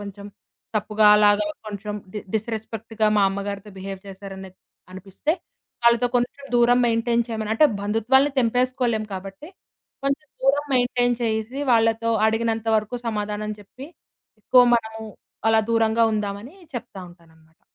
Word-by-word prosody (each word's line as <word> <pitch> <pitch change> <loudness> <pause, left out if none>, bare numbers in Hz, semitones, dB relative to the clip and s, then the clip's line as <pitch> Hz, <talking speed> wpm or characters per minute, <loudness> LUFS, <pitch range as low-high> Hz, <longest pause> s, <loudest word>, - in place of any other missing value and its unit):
కొంచెం 200 0 -9 0.5
తప్పుగా 215 0 +2
అలాగా 210 0 +4 0.2
కొంచెం 210 0 -5 0.2
డి 210 - -2 0.2
డిస్‌రెస్పెక్ట్‌గా 220 0 -2
మా 205 - +4
అమ్మగారితో 200 +1 -5
బిహేవ్ 195 0 -6
చేశారనేది 190 -1 -10 0.3
అనిపిస్తే. 195 - -3 0.5
వాళ్ళతో 235 +1 +5
కొంచెం 245 +3 -2
దూరం 240 +1 +5
మెయింటైన్ 235 0 +1
చేయమని. 220 -1 -3
అంటే 305 +6 +6 0.2
బంధుత్వాల్ని 235 +7 +2
తెంపేసుకోలేము 245 -2 +1
కాబట్టి. 195 - -8 0.6
కొంచెం 275 +3 -1 0.2
దూరం 285 +2 +2
మెయింటైన్ 245 -1 +2
చేయసి 220 +3 -2
వాళ్ళతో 225 0 +2 0.2
అడిగినంత 225 0 0
వరకు 215 +3 -2
సమాధానం 210 -1 -3
చెప్పి. 250 +7 -12 0.5
ఎక్కువ 250 +4 +5
మనము 220 -1 -2 0.5
అలా 225 0 +5
దూరంగా 225 0 +2
ఉందామని 210 - -4 0.2
చెప్తా 225 -5 -7
ఉంటాననమాట. 160 -2 -22
220 Hz, 120 wpm, -23 LUFS, 205-240 Hz, 0.6 s, అంటే